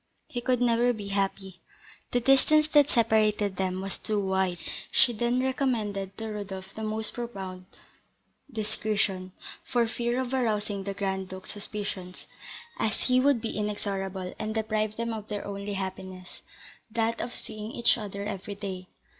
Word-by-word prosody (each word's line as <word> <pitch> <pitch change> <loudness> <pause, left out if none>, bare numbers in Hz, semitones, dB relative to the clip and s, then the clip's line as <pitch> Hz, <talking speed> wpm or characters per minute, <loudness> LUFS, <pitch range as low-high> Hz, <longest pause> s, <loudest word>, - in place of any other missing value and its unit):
He 245 -6 -3
could 250 0 +2
never 240 0 +4
be 205 -3 -6
happy; 195 -1 -1 0.5
the 245 - +2
distance 270 +5 +5
that 295 -2 +6
separated 215 -4 +3
them 185 -1 0
was 195 0 -4
too 215 -1 0
wide! 190 -2 +1 0.3
She 245 - +5
then 240 +3 +1
recommended 220 -8 0
to 225 0 -4
Rodolph 195 -2 -5
the 220 - -6
most 215 0 0
profound 190 -6 -5 0.9
discretion, 210 -4 -1 0.3
for 240 -2 +2
fear 240 +2 0
of 260 0 -2
arousing 210 -5 0
the 200 -1 -3
Grand 190 -1 -1
Duke's 185 0 -4
suspicions, 205 -3 -4 0.5
as 220 -1 +1
he 255 0 +4
would 270 -3 +4
be 225 - -3
inexorable, 195 -3 -2
and 215 +1 -2
deprive 215 -1 0
them 230 0 -1
of 215 -1 -5
their 205 -1 -3
only 200 0 -4
happiness, 190 -1 -5 0.5
that 230 +1 +1
of 240 - -4
seeing 215 +1 -6
each 235 0 +5
other 200 -3 -4
every 200 0 -4
day. 190 -2 -5
210 Hz, 155 wpm, -29 LUFS, 195-235 Hz, 0.9 s, that